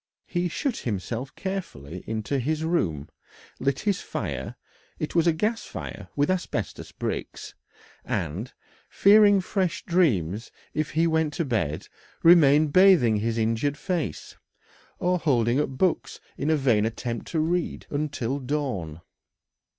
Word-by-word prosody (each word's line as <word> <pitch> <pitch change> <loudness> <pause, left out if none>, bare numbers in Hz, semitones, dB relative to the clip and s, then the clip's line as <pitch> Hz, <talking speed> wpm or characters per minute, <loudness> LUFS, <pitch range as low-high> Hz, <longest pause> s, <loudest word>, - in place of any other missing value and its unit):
He 175 0 -1
shut 255 - -2
himself 115 +5 -4
carefully 160 - -5
into 110 +5 -2
his 155 +5 -1
room, 85 - 0 0.5
lit 135 0 0
his 205 -3 0
fire - - -4 0.4
it - - -4
was 170 0 +3
a - - +6
gas 215 +8 -1
fire - - -7
with 145 +4 +2
asbestos 175 - -3
bricks - - -5 0.5
and, 100 - -3 0.4
fearing 205 -1 +6
fresh 185 -2 -1
dreams 115 - +1 0.2
if 155 -1 -2
he 165 +2 +3
went 160 -2 +1
to 170 - -1
bed, 100 - -1 0.4
remained 155 -3 +6
bathing 185 - +6
his 115 +2 -1
injured 115 +6 0
face, 175 -3 -3 0.6
or 180 0 +1
holding 125 -5 +2
up 150 - 0
books 165 +7 -1 0.2
in 145 - -2
a 160 - +4
vain 120 -7 +3
attempt 115 +1 -3
to 165 - -1
read, 170 +2 -1
until 145 -3 -2
dawn. 125 - -3
145 Hz, 135 wpm, -26 LUFS, 115-175 Hz, 0.6 s, a